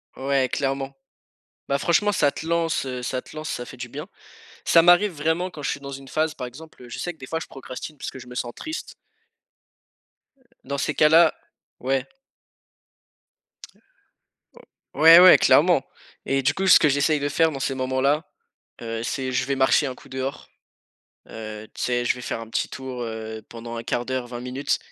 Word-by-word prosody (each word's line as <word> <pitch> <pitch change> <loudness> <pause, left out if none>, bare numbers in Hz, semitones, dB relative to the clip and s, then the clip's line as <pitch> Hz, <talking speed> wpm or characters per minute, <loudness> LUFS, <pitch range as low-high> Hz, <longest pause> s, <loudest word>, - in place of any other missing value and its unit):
Ouais, 135 -1 +1
clairement. 135 0 -2 0.7
Bah, 140 - +1
franchement 200 +7 +2
ça 145 -5 +3
te - - -8
lance, 165 -4 0
heu, 125 -1 -5
ça 130 +1 -2
te - - -15
lance, 155 0 -5
ça 120 - -4
fait - - -11
du 125 -1 -7
bien. - - -7 0.6
Ça 165 - +6
m'arrive 175 +4 +5
vraiment 160 +4 -1
quand 150 -4 -10
je - - -1
suis - - -4
dans 140 0 -8
une 135 0 -9
phase 155 +2 0
par 125 - -5
exemple, 135 0 -13
je - - -6
sais 175 - -4
que - - -28
des 130 - -10
fois 160 +4 -2
je - - -7
procrastine 135 +3 -9
parce - - -5
que 130 - -10
je 125 - -11
me 125 - -10
sens 120 -1 -3
triste 315 +1 -5 1.8
dans 140 +1 -4
ces 150 - -1
cas-là, 160 +1 +6 0.5
ouais. 135 +1 0 2.9
Ouais, 165 +2 +9
ouais, 185 0 +9
clairement - - +4 0.4
et 135 0 +1
du 145 +2 +2
coup 190 +4 -1
ce - - +9
que - - +4
j'essaye 145 +2 +2
de 145 - -1
faire 160 +2 +2
dans 140 - -6
ces 135 0 -1
moments 130 0 -1
là, 145 +4 +2 0.6
heu, 115 -1 -4
c'est 130 +2 -3
je 135 - +1
vais 140 +1 -1
marcher 135 +2 +3
un 130 - -4
coup - - -16
dehors. 130 +2 -5 0.8
Heu, 110 -1 -8
tu - - -8
sais, 120 -1 0
je - - +3
vais 125 - -9
faire 115 - -4
un 115 - -8
petit - - -1
tour, 130 -2 -6
heu, 110 -1 -6
pendant 115 0 -8
1/4 120 +1 -2
d'heure, 130 -2 -3
20 120 0 -7
minutes 135 +3 -1
135 Hz, 195 wpm, -24 LUFS, 125-155 Hz, 2.9 s, Ouais